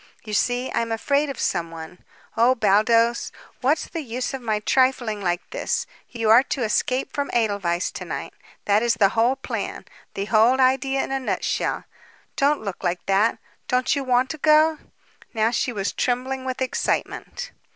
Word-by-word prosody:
You 215 - -6
see, 245 +4 0
I - - 0
am 230 0 -3
afraid 280 +6 +1
of 275 - -5
someone. 165 -1 -3 0.4
Oh, 240 +3 +4
Baldos, 230 +2 +3 0.3
what's 285 +5 +1
the 330 - -5
use 250 0 -4
of 265 - -5
my 220 -3 0
trifling 245 -2 +1
like 175 -1 -1
this? - - -2 0.2
You 225 -2 0
are 235 +3 +8
to 270 -1 -3
escape 255 +4 0
from 285 -1 -2
Edelweiss 200 -6 0
to - - -7
night. - - -5 0.3
That 205 +1 +3
is 240 0 +2
the 200 -2 +4
whole 230 +5 +2
plan 270 - -5 0.3
the 195 - -2
whole 225 +4 +4
idea 270 +1 +2
in - - -6
a 270 - 0
nutshell. 260 - -2 0.5
Don't 285 -2 +2
look 200 -3 -6
like 175 0 -2
that. 200 +4 +2 0.3
Don't 255 +2 +1
you 280 - -2
want 255 0 +2
to 310 - -7
go?" 310 +1 +4 0.6
Now 220 +1 +2
she 245 +2 0
was 200 -3 -2
trembling 260 +1 -1
with 260 0 -2
excitement. 260 - -3
240 Hz, 170 wpm, -23 LUFS, 215-265 Hz, 0.6 s, are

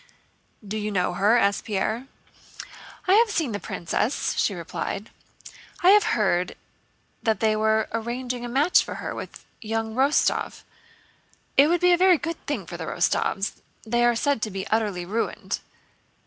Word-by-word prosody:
"Do 215 +2 -3
you 210 0 -2
know 180 -2 0
her?" 205 +6 +3
asked 200 -3 +1
Pierre. 220 +5 -2 1.0
"I 370 - +5
have 450 +2 +5
seen 320 - -1
the 205 - -3
princess," 200 - -2
she 200 - +1
replied. 190 +4 -5 0.7
"I 390 +4 +8
heard 180 -5 +1 0.7
that 220 -1 +1
they 220 -1 +2
were 220 0 +2
arranging 245 +2 -3
a 240 - -4
match 285 +8 +4
for - - -7
her - - -5
with - - -9 0.2
young 225 0 -3
Rostóv. 270 +5 +1 0.9
It 280 - +7
would 345 +1 +1
be 360 0 +5
a 350 - +4
very 370 -2 +6
good 330 +3 -5
thing - - -2
for - - -7
the - - -5
Rostóvs, 195 +1 -1 0.2
they 240 +2 +1
are 240 0 +4
said 280 0 0
to 215 - -1
be 195 -1 -5
utterly 210 -5 0
ruined." 220 +6 -2
225 Hz, 160 wpm, -25 LUFS, 205-270 Hz, 1.0 s, I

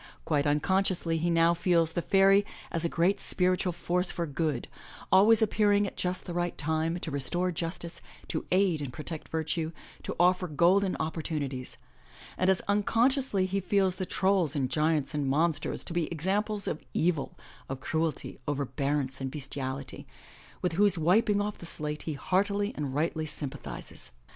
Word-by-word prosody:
Quite 145 -2 +1
unconsciously 170 +2 +1
he 170 +2 0
now 165 0 +4
feels 170 -2 +2
the 175 - 0
fairy 195 +2 +5 0.3
as 165 - +3
a 170 - +2
great 185 +5 +2
spiritual 185 0 +1
force 175 +1 -1
for 170 - -2
good, 150 -3 -2 0.4
always 215 +4 +6
appearing 205 -1 +3
at 195 - -6
just 180 0 -2
the 175 - -5
right 175 0 -2
time, 160 +2 0
to 160 - -4
restore 175 +7 +1
justice, 170 0 -5 0.3
to - - -2
aid 185 -4 +3
and 140 -3 -4
protect 155 +5 -7
virtue, 160 0 -2 0.3
to - - -5
offer 180 +1 +3
golden 180 +5 +3
opportunities; 150 -5 -3 0.6
and 185 - +1
as 190 - +3
unconsciously 225 +1 +2
he 195 +1 -1
feels 190 -1 +1
the 185 - -3
trolls 190 -6 +1
and 130 -3 -1
giants 155 -1 +1
and 145 -2 -1
monsters 155 +1 0
to - - -6
be 170 -3 0
examples 200 +5 -1
of 155 - -2
evil, 165 -4 0 0.3
of 135 0 -4
cruelty, 160 0 -2
overbearance 140 -1 -1
and 135 - -2
bestiality, 135 -1 -5 0.6
with 180 - +1
whose 200 +1 +3
wiping 200 +6 +3
off 205 0 -3
the 170 - -7
slate 150 -2 -4
he - - -1
heartily 200 +6 0
and 140 -3 -3
rightly 155 +1 -1
sympathizes. 145 - -7
170 Hz, 160 wpm, -29 LUFS, 150-190 Hz, 0.6 s, always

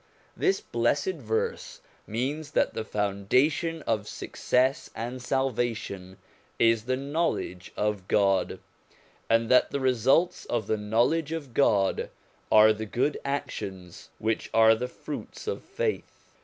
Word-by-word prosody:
This 385 0 +1
blessed 380 - 0
verse 475 +2 -3 0.3
means 145 +8 -3
that - - +2
the - - -3
founda 105 +7 +1
tion 165 0 -4
of 105 -2 -1
success 130 +4 0
and 120 +3 -5
salvation 120 -8 -2 0.4
is 115 -1 +3
the 130 +1 0
knowledge 140 - -2
of 105 -3 -1
God, 95 -3 +2 0.7
and 115 0 +3
that 125 - +5
the 140 - -2
results 130 +7 +2
of 115 -3 -1
the 110 - 0
knowledge 120 +10 +1
of 150 -7 -5
God 100 -8 +2 0.4
are 110 0 +7
the 110 0 -6
good 125 +7 0
actions 95 -10 -5
which 110 0 -1
are 110 0 +7
the 125 +3 -2
fruits - - -8
of 445 - -3
faith. 475 -3 -4
120 Hz, 130 wpm, -27 LUFS, 105-145 Hz, 0.7 s, are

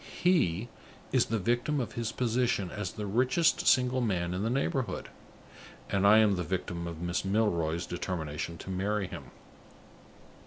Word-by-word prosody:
He 120 - +3 0.4
is - - +3
the 115 - 0
victim 120 +8 0
of 115 -4 -3
his 115 -1 -2
position 120 -6 0
as 105 -3 -4
the 105 - -5
richest 130 - +2
single 125 -1 +4
man 90 -6 0
in 90 - -2
the 110 - 0
neighborhood; 135 +1 -1 0.8
and 100 0 +3
I 105 +2 +8
am 105 -3 +4
the 90 - -1
victim 85 -1 -3
of 85 -1 -6
Miss 85 0 -1
Milroy's 90 -5 0
determination 85 -2 -4
to 95 - -7
marry 100 +2 -1
him." - - -8
105 Hz, 155 wpm, -30 LUFS, 90-120 Hz, 0.8 s, I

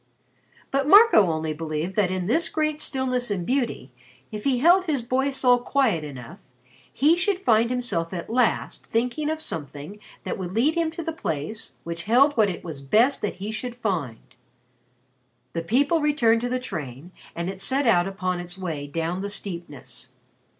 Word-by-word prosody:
But 275 +1 0
Marco 385 - +7
only 155 0 -2
believed 160 +3 -4
that 205 -4 +2
in 185 -1 -2
this 325 - +1
great 305 -1 -1
stillness 255 -3 0
and 190 -4 -2
beauty, 245 - -1 0.4
if 210 -1 -7
he 270 -2 +2
held 350 +8 +5
his 285 -8 -1
boy 260 +3 0
soul 250 -2 +3
quiet 240 - +1
enough, 145 - -9 0.5
he 305 +5 +4
should 380 +2 0
find 230 - +3
himself 245 -10 -1
at 175 -3 -5
last 240 0 0
thinking 250 +6 -1
of 315 0 -2
something 150 - -6 0.2
that - - -4
would 185 0 -5
lead 270 +8 +3
him 335 -1 0
to 335 +1 -6
the 325 - -2
place 190 - -4
which 170 0 -4
held 270 +7 +4
what 215 -3 +4
it 180 - -6
was 155 -5 -6
best 225 - +3
that 210 - -2
he 200 +3 -5
should 235 +2 -4
find. 175 - -4 1.2
The 165 - -2
people 280 - +2
returned 240 -7 +3
to 245 - -2
the 255 +1 -1
train 155 - -7 0.2
and 170 +1 -3
it 190 0 -5
set 270 +7 +2
out 180 -6 +4
upon 185 -2 -2
its 175 +1 -6
way 160 -6 -4
down 165 +5 -3
the 200 - -3
steepness. 170 -11 -7
215 Hz, 180 wpm, -24 LUFS, 170-270 Hz, 1.2 s, Marco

